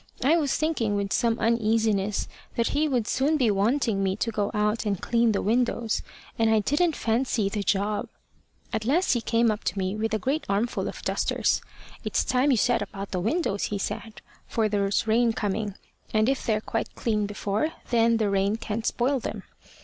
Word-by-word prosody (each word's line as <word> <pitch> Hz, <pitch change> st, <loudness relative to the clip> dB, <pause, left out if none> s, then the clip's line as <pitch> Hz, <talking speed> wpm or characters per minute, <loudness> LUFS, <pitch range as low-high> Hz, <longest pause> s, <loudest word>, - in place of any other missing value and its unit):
I 290 Hz, +6 st, +5 dB
was 295 Hz, -5 st, +1 dB
thinking 270 Hz, -10 st, 0 dB
with 200 Hz, -1 st, -1 dB
some 235 Hz, -1 st, +2 dB
uneasiness 220 Hz, -3 st, +1 dB, 0.3 s
that 235 Hz, -, +1 dB
he 305 Hz, +2 st, +1 dB
would 245 Hz, -6 st, 0 dB
soon 290 Hz, +4 st, +2 dB
be 245 Hz, -6 st, +3 dB
wanting 210 Hz, +1 st, +1 dB
me 190 Hz, -1 st, +1 dB
to 230 Hz, +2 st, -1 dB
go 210 Hz, -2 st, -1 dB
out 210 Hz, 0 st, 0 dB
and 200 Hz, -4 st, -1 dB
clean 235 Hz, -1 st, +2 dB
the 200 Hz, -, -1 dB
windows, 235 Hz, 0 st, +1 dB, 0.4 s
and 225 Hz, 0 st, +4 dB
I 220 Hz, -, +4 dB
didn't 295 Hz, -, +2 dB
fancy 230 Hz, -3 st, 0 dB
the 205 Hz, 0 st, -2 dB
job. 200 Hz, +2 st, 0 dB, 0.6 s
At 220 Hz, -, -1 dB
last 300 Hz, +10 st, +2 dB
he 240 Hz, -, 0 dB
came 230 Hz, 0 st, +2 dB
up 210 Hz, -, -4 dB
to -, -, -1 dB
me 190 Hz, +1 st, -1 dB
with 220 Hz, +1 st, -1 dB
a -, -, +2 dB
great 280 Hz, +8 st, -1 dB
armful 205 Hz, +4 st, 0 dB
of -, -, -7 dB
dusters. -, -, +1 dB, 0.4 s
`It's -, -, 0 dB
time 255 Hz, +3 st, +2 dB
you 260 Hz, -, +4 dB
set 245 Hz, +3 st, +2 dB
about 195 Hz, 0 st, -6 dB
the 185 Hz, -, -1 dB
windows,' 215 Hz, -, 0 dB
he 205 Hz, -, -2 dB
said; 215 Hz, +2 st, -5 dB, 0.3 s
`for 225 Hz, -2 st, +2 dB
there's 200 Hz, 0 st, +1 dB
rain 230 Hz, +1 st, +3 dB
coming, 205 Hz, -1 st, -2 dB, 0.4 s
and 215 Hz, 0 st, +2 dB
if 270 Hz, 0 st, -1 dB
they're 215 Hz, -2 st, +1 dB
quite 225 Hz, 0 st, -3 dB
clean 210 Hz, -3 st, 0 dB
before, 205 Hz, +6 st, -1 dB, 0.2 s
then 230 Hz, -1 st, +4 dB
the 220 Hz, -2 st, +1 dB
rain 195 Hz, +1 st, +2 dB
can't 220 Hz, 0 st, -3 dB
spoil 265 Hz, +3 st, +1 dB
them.' -, -, -5 dB
220 Hz, 195 wpm, -26 LUFS, 205-240 Hz, 0.6 s, I